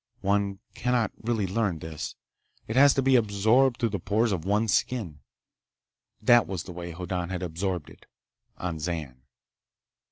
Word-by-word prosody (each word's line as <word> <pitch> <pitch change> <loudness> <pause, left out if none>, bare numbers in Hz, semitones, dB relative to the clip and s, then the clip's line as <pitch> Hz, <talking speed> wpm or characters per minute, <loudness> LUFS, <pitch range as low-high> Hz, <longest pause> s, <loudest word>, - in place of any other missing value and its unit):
One 100 0 +1 0.2
cannot 120 -2 0
really 115 -3 0
learn 95 -2 0
this. 80 0 -6 0.5
It 110 - -4
has 140 +1 +7
to 135 - +1
be 135 0 +4
absorbed 115 +3 +3
through 115 - +1
the 100 -2 -3
pores 110 +5 +1
of 90 -4 -2
one's 105 +2 +2
skin. 95 -13 -1 1.0
That 120 -2 +5
was 95 -4 -4
the - - -9
way 85 0 -6
Hoddan 90 +1 -4
had 90 -1 -3
absorbed 90 -1 -3
it, - - -18 0.5
on 85 -3 -4
Zan. 75 -6 -4
100 Hz, 155 wpm, -27 LUFS, 90-115 Hz, 1.0 s, has